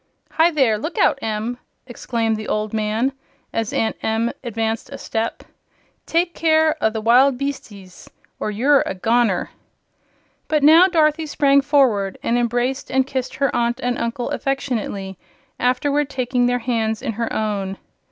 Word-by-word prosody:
"Hi, 325 +1 +4
there 260 -10 +2
look 315 +7 -5
out, 275 - +3
Em!" 225 +3 -3 0.3
exclaimed 230 -2 -2
the 215 0 -6
old 215 0 -2
man, 220 +4 0 0.4
as 225 -1 -2
Aunt 225 - 0
Em 225 +1 0
advanced 225 -1 -3
a - - -7
step; 225 0 -3 0.6
"take 340 +1 +1
care 315 -1 +3
o' 220 - +4
the 220 0 -4
wild 250 +4 +4
beastses, 210 -9 -7 0.3
or - - -2
you're 265 +7 +3
a - - -3
goner!" 225 -1 +1 1.0
But 305 -2 +1
now 325 +5 +8
Dorothy 315 -3 +2
sprang 280 -1 +3
forward 255 -9 +2
and 235 - +1
embraced 245 +3 -1
and 265 0 +2
kissed 260 -1 -4
her 275 -1 0
aunt 235 +1 0
and 245 0 -1
uncle 235 +1 -3
affectionately, 215 -8 -3 0.4
afterward 280 +3 +1
taking 250 -2 0
their 245 0 +1
hands 225 -3 -1
in - - -1
her 230 +1 -3
own. 200 -3 -2
245 Hz, 150 wpm, -20 LUFS, 220-275 Hz, 1.0 s, now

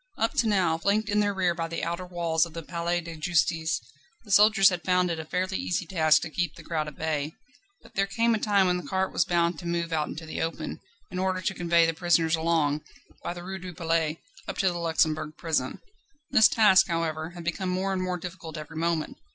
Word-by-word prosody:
Up 225 - 0
to 230 - +3
now, 180 -6 +2
flanked 205 +5 +1
in 210 0 +2
their 205 -1 +2
rear 185 -3 +1
by 165 -1 -3
the 165 0 -4
outer 170 +2 -3
walls 170 -2 +1
of 165 - -15
the 165 0 -6
Palais 170 +1 -1
de 170 -1 -8
Justice, 160 0 +1 0.4
the 210 - -11
soldiers 205 -1 +7
had 180 -2 -3
found 180 -1 +2
it 165 - -3
a 160 - -5
fairly 185 +4 -2
easy 180 0 -1
task 160 -3 +3
to 160 - -6
keep 170 -1 -2
the - - -12
crowd 155 -2 -2
at 150 - -8
bay. 155 -1 -2 0.5
But - - -17
there 195 0 +1
came 230 +4 +2
a 220 - 0
time 200 -2 +3
when 180 -1 +2
the 180 - -7
cart 190 0 -1
was - - +2
bound 170 -2 +1
to 175 - -7
move 170 -1 -1
out 155 -2 0
into 160 +2 -7
the 155 - -4
open, 160 -1 -4 0.3
in 185 - -4
order 185 0 0
to 190 - 0
convey 170 -2 +3
the 165 - 0
prisoners 165 0 +2
along, 160 -3 +1 0.4
by 175 - -3
the 175 - -8
Rue 190 +1 -5
du 180 -2 -8
Palais, 165 -2 0 0.3
up - - -5
to 190 - +3
the 175 -1 -4
Luxembourg 155 -2 0
Prison. 155 -6 -1 0.5
This 220 - +7
task, 205 -4 +5
however, 165 -2 -2
had 170 - -7
become 175 +2 -2
more 190 +2 -1
and 185 - -1
more 180 -1 -1
difficult 170 -2 -8
every 155 +1 -8
moment. 165 -1 -1
170 Hz, 235 wpm, -27 LUFS, 160-185 Hz, 0.5 s, soldiers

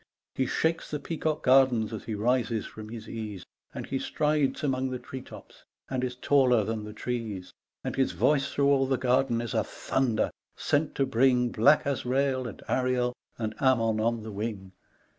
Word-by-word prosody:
He 130 - 0
shakes 165 +1 0
the 150 - -3
peacock 155 0 -2
gardens 125 -4 +4
as 110 - -6
he 110 - -3
rises 115 0 +1
from 110 0 -9
his 110 -1 -8
ease, 105 -5 -6 0.3
And - - -6
he 135 - -2
strides 150 -1 0
among 130 -2 0
the 130 - -3
tree 130 +1 -8
tops - - -13 0.3
and 130 -1 -1
is 125 -1 -2
taller 125 -3 +3
than 110 0 -3
the 105 - -7
trees, 110 -5 -4 0.3
And - - -3
his 135 -1 +1
voice 140 -2 +2
through 140 0 +2
all 135 -1 +3
the 135 -1 +1
garden 125 -2 +2
is 120 -3 -4
a - - +2
thunder 120 -5 0 0.2
sent 145 +1 0
to 135 - +2
bring 125 0 +3
Black 145 +8 +4
Azrael 130 -1 0
and 110 - -9
Ariel 125 -1 +1 0.2
and 110 -1 -3
Ammon 115 -5 +3
on 115 0 0
the 110 - -6
wing. 100 -2 -5
125 Hz, 180 wpm, -28 LUFS, 110-135 Hz, 0.3 s, gardens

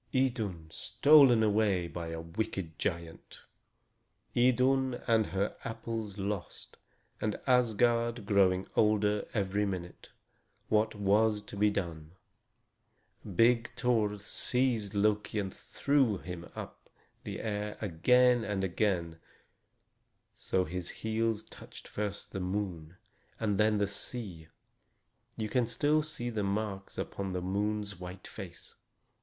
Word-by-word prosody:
Idun 110 -10 0
stolen 120 - +5
away 105 -4 +2
by 85 0 -6
a 80 0 -5
wicked 85 -1 -4
giant! 85 -2 -4 0.9
Idun 130 +1 +3
and 110 -2 +3
her 100 +2 -1
apples 115 -2 -5
lost, 100 -2 -5 0.4
and 105 -1 -1
Asgard 120 -2 +2
growing 95 -2 +3
older 105 -1 +2
every 100 0 +1
minute! 90 -3 -5 0.6
What 110 +1 +2
was 105 +1 +2
to - - -10
be 105 +1 +3
done? 85 -5 -4 1.2
Big 115 +1 +4
Thor 110 -5 +1
seized 110 0 -1
Loki 105 +1 +1
and 95 -2 -2
threw 135 -7 +1
him 90 -1 -8
up - - -9 0.3
in - - -5
the - - -5
air 105 -1 -3
again 120 +6 +4
and 100 -3 -2
again, 90 -3 0 1.2
so 95 - 0
that 80 - -8
his 90 -1 -4
heels 110 0 -1
touched - - -13
first 100 -1 -4
the 95 - -4
moon 90 -3 -3 0.4
and 105 -3 0
then 105 0 +4
the 100 - +2
sea; 100 -5 -4 0.9
you 110 - -2
can 120 +1 +1
still 145 +6 +2
see 120 -6 -4
the 110 -2 -2
marks 100 -1 -3
upon 95 -1 -4
the 90 - -2
moon's 105 +1 -2
white 90 +1 -8
face. 95 -5 -9
105 Hz, 125 wpm, -31 LUFS, 95-115 Hz, 1.2 s, stolen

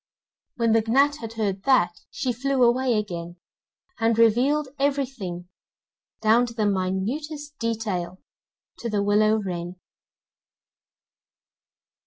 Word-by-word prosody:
When 230 -2 +1
the 225 0 +4
gnat 280 +5 +3
had 225 -5 -7
heard 200 -4 -2
that, 255 -10 +4 0.2
she 255 -2 -2
flew 270 +2 +1
away 245 0 +3
again, 175 -4 -4 0.6
and 225 0 +2
revealed 255 +6 +3
everything, 260 -11 -2 0.7
down 230 +3 +4
to 230 - -9
the 215 -2 0
minutest 245 +11 -2
detail, 205 -6 -3 0.6
to 235 - -4
the 205 -2 0
willow 215 +1 +3
wren. 180 -4 -4
225 Hz, 110 wpm, -24 LUFS, 195-260 Hz, 0.7 s, the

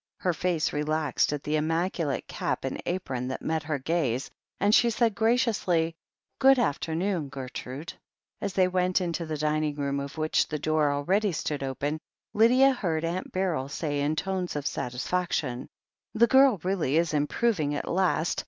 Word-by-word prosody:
Her 180 - 0
face 165 -1 0
relaxed 150 -1 0
at 150 -1 -3
the 155 +1 0
im 155 +1 0
maculate 165 -3 -1
cap - - -3
and - - -3
apron 130 -9 -2
that 130 - -5
met 160 0 0
her 155 0 -2
gaze, 135 -3 -1 0.3
and 205 +2 +3
she 235 +1 +5
said 230 -1 +2
graciously: 215 -8 +1 0.4
"Good 270 0 +6
af 170 - +1
temoon, 165 -2 -2
Gertrude." 135 +3 -7 0.5
As 200 -2 -2
they 185 -2 +3
went 185 0 +1
into 170 -2 -3
the 155 -1 -3
dining 150 0 0
room, 140 -1 -1
of 140 +3 -6
which 155 0 +1
the 150 - -3
door 155 -1 +1
already 185 +9 +1
stood 150 -3 -3
open, 140 +3 -2 0.3
Lydia 255 +5 +5
heard 165 -9 -1
Aunt 175 +3 -3
Beryl 175 -8 -1
say 145 -1 -2
in 150 +2 0
tones 185 0 -2
of 145 -1 -3
satisfaction: 130 0 -2 0.5
"The 230 +2 +6
girl 265 -3 +5
really 180 -6 +1
is 165 -1 +1
improving 150 +1 +1
at - - -4
last. 180 -2 +1
160 Hz, 170 wpm, -27 LUFS, 145-185 Hz, 0.5 s, Good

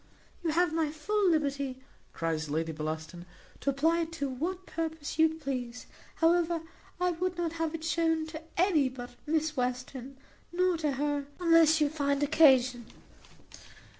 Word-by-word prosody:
"You 335 - 0
have 335 +1 +2
my 320 -2 +1
full 380 +6 +1
liberty," 280 -4 0 0.3
cries 160 -2 -2
Lady 160 +2 -1
Bellaston, 155 +2 -5 0.4
"to - - -1
apply 320 +5 +2
it 330 -1 -2
to 285 -4 -2
what 350 +8 -4
purpose 320 -2 -4
you 320 0 +6
please. 255 -5 -5 0.3
However, 335 0 +2 0.4
I 360 0 +2
would 355 +1 -2
not 340 -2 -1
have 325 0 -1
it 320 - -7
shewn 325 0 +1
to 315 0 -7 0.2
any 330 -7 +3
but 245 -1 -8 0.2
Miss 315 0 0
Western, 255 +1 -3 0.3
nor 365 +1 +2
to 305 -3 0
her 290 0 -1
unless 330 -2 +5
you 300 - +3
find 285 -1 0
occasion." 260 -6 +4
305 Hz, 150 wpm, -30 LUFS, 260-330 Hz, 0.4 s, you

